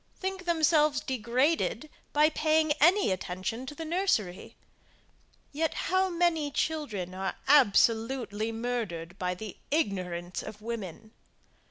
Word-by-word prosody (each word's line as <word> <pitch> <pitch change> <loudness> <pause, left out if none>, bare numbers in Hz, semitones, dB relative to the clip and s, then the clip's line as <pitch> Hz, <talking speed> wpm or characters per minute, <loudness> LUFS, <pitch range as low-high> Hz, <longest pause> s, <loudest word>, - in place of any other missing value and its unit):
think 380 -1 -4
themselves 310 -3 +3
degraded 260 +6 0 0.2
by 300 +1 +5
paying 310 0 +2
any 350 - +5
attention 190 +7 -4
to 295 - -7
the 325 - -6
nursery; 310 - -1 1.0
yet, 315 +2 -1
how 375 +1 +1
many 340 -4 +1
children 255 - -2
are 190 +1 -3
absolutely 230 -3 +3
murdered 225 -8 -4
by 180 -1 -1
the 210 +1 -8
ignorance 185 - -2
of 210 - -9
women! 220 -2 -6
250 Hz, 115 wpm, -29 LUFS, 200-315 Hz, 1.0 s, by